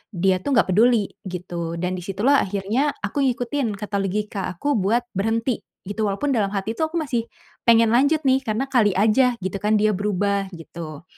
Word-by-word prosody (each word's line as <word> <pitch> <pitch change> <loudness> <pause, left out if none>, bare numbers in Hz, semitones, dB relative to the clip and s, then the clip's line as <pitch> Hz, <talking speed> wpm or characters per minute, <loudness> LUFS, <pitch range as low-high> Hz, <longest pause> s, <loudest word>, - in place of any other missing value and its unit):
dia 185 +1 +2
tuh 285 - -2
enggak 195 - +3
peduli 225 -1 +4 0.2
gitu 170 -2 -5
dan 180 +1 -1
di - - -9
situlah 215 +10 +2
akhirnya, 205 +9 0
aku 290 - -2
ngikutin 245 -2 -1
kata 210 -1 -5
logika 200 0 -2
aku 285 +12 -1
buat 225 +6 +1
berhenti, 225 +4 0 0.3
gitu 215 +2 -2
walaupun 275 +9 -1
dalam 205 -3 +2
hati 200 +2 -2
tuh 315 - +2
aku - - -7
masih, 240 -7 -2 0.4
pengen 230 -1 +6
lanjut 285 +5 +3
nih 260 0 +4
karena 230 +3 -1
kali 220 -6 +4
aja, 235 +5 +3
gitu 190 +1 -2
kan 215 +1 +3
dia 215 0 +3
berubah, 200 0 0
gitu. 165 -1 -9
210 Hz, 185 wpm, -22 LUFS, 195-245 Hz, 0.4 s, pengen